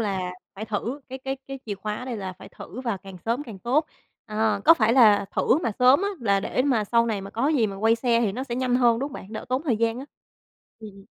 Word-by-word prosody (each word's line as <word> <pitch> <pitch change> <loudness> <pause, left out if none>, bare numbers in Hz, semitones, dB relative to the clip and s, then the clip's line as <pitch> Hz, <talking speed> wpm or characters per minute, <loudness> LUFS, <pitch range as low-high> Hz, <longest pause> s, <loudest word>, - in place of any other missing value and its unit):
là 190 -4 -2 0.2
phải 215 +3 -6
thử, 230 +6 -3
cái 265 +1 -6
cái 270 +1 -4
cái 270 - -6
chìa 205 - -3
khóa 210 +2 -4
ở 250 - -7
đây 245 -3 -4
là 190 -2 -5
phải - - -13
thử 250 - -9
và 230 -6 -2
càng 190 0 -11
sớm 235 +5 0
càng 225 -8 -10
tốt. 270 - +1 0.4
Ờ, 215 -1 0
có 330 - +8
phải 225 -5 +2
là 210 -6 +6
thử 265 - +3
mà 230 - -1
sớm 255 +8 +5
á 400 - +1
là 200 -3 +2
để 255 - -1
mà 245 -7 +1
sau 235 +2 +2
này 210 -3 -1
mà 195 +1 -8
có 250 +6 0
gì 260 -8 +2
mà 195 -1 -6
quay 225 +3 +3
xe 235 -1 +2
thì 210 -4 +1
nó 255 +4 -4
sẽ 240 - -4
nhanh 255 -1 0
hơn, 235 -2 +4
đúng 275 - -2
hông 285 - -15
bạn? 200 +4 -9
Đỡ 220 - -5
tốn 255 +3 0
thời 250 -9 +1
gian 230 +1 0
á. 270 - -6 0.7
Ừm, 215 -2 -9
ừm. 195 0 -16
230 Hz, 280 wpm, -25 LUFS, 205-255 Hz, 0.7 s, có